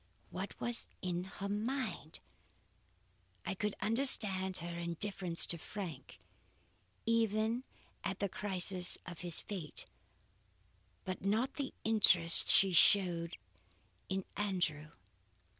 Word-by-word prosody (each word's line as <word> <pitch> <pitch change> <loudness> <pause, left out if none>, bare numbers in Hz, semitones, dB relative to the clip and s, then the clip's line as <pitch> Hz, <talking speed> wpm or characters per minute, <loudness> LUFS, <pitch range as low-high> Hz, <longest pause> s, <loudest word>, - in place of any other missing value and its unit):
What - - -7
was 240 -1 -4 0.2
in 180 0 -3
her 195 +1 -7
mind? 235 +7 -4 1.2
I - - -3
could 210 +2 -4
understand 200 -5 +4
her 170 0 -6
indifference 170 0 +2
to 170 - +1
Frank 165 -8 -9 0.9
even 225 +1 0 0.4
at - - -4
the 200 - -2
crisis 185 -2 +4
of 175 -3 -10
his 175 -3 +3
fate, 180 -7 -6 1.2
but 185 - -5
not 225 +7 -1
the 275 -2 -5
interest 185 -6 +5
she 195 -1 +4
showed 175 -2 +3 0.7
in 190 0 -3
Andrew. 180 -7 -2
190 Hz, 105 wpm, -33 LUFS, 175-210 Hz, 1.2 s, interest